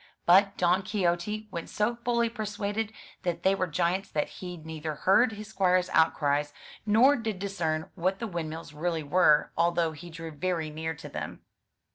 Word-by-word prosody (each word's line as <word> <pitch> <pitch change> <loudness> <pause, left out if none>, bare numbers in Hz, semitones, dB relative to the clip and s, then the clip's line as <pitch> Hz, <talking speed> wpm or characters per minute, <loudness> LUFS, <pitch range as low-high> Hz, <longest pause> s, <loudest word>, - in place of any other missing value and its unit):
But 195 +3 +5
Don 180 +1 +3
Quixote 200 +2 -1
went 170 -2 -5
so 210 +3 0
fully 235 -1 +2
persuaded 215 -1 -3 0.3
that 175 -2 -2
they 190 - +4
were 185 -1 0
giants 180 +4 0
that 150 - -1
he 180 -1 -8
neither 160 -1 -5
heard 210 - +4
his 210 0 -8
squire's 185 -3 +2
outcries, 145 -2 +2 0.3
nor 240 +7 +6
did 225 -5 -3
discern 170 -5 -2
what 190 +1 0
the 230 - -4
windmills 165 -5 -5
really 160 +1 -2
were, 150 0 +4
although 170 -1 +2
he 165 +3 -10
drew 165 0 -7
very 160 0 -2
near 160 +1 -4
to - - -9
them. - - -6
180 Hz, 165 wpm, -28 LUFS, 160-205 Hz, 0.3 s, nor